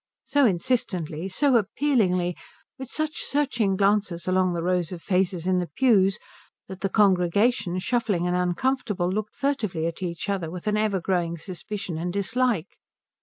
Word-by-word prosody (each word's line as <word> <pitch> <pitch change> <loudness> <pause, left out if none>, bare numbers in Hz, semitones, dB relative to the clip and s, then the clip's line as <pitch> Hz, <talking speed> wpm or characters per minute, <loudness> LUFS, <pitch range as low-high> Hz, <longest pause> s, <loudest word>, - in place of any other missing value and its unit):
so 285 -3 +4
insistently, 185 -5 -1
so 265 +6 +3
appealingly, 200 - +1 0.4
with 265 -2 -7
such 310 +1 -2
searching 250 -9 0
glances 195 -3 +1
along 185 0 +2
the 170 -1 -2
rows 180 -1 0
of 180 - -6
faces 180 -1 0
in 185 -1 +2
the 175 - -3
pews, 200 -7 +4 0.5
that 190 0 -9
the 195 - 0
congregation, 190 0 +2
shuffling 205 -3 0
and 180 0 0
uncomfortable, 180 +1 0
looked 210 +2 -3
furtively 215 - -1
at 165 +2 -4
each 170 -1 -4
other 190 -5 -2
with 180 +1 -8
an 210 0 +1
ever 210 -2 +1
growing 170 -2 -1
suspicion 180 0 -6
and 175 +2 -2
dislike. 215 -2 -1
190 Hz, 155 wpm, -25 LUFS, 175-220 Hz, 0.5 s, so